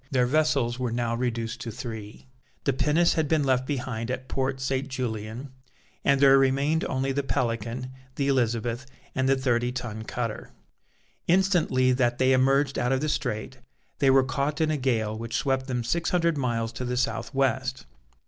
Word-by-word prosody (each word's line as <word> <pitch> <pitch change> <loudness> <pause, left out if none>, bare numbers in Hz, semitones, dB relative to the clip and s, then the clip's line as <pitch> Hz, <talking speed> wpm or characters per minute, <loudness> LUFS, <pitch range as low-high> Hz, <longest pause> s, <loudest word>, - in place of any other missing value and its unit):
Their 125 -2 +2
vessels 135 -3 +1
were 125 -2 -1
now 120 0 -1
reduced 115 0 -2
to 120 - -5
three; 110 -3 -7 0.4
the 140 - +1
pinnace 155 +6 +3
had 160 -2 0
been 155 -1 +2
left 130 -1 +1
behind 125 -5 -3
at 130 +1 -4
Port 135 0 -1
St. 130 +1 -1
Julian, 125 0 -4 0.5
and 140 -1 +3
there 135 0 +7
remained 140 +4 +2
only 135 +1 -1
the 140 +1 0
Pelican, 125 -2 -2 0.2
the 140 - 0
Elizabeth, 120 -1 0 0.3
and 130 0 +1
the 135 - +5
thirty 125 -2 +1
ton 120 -4 -5
cutter. 115 -1 -4 0.8
Instantly 175 -9 +3
that 120 -1 +1
they 130 0 +4
emerged 135 +2 +3
out 125 - +1
of 135 0 +1
the 155 - 0
Strait, 110 -6 -3 0.4
they 135 - +4
were 135 0 +6
caught 140 +3 -2
in 155 -1 +2
a 155 - 0
gale 115 -5 0
which 115 +1 -3
swept 135 -1 0
them 125 -2 -2
six 170 +8 0
hundred 170 -2 +2
miles 120 -4 -1
to 125 - -5
the 125 0 -2
south 130 +2 -1
west. 130 -1 0
130 Hz, 175 wpm, -26 LUFS, 120-140 Hz, 0.8 s, there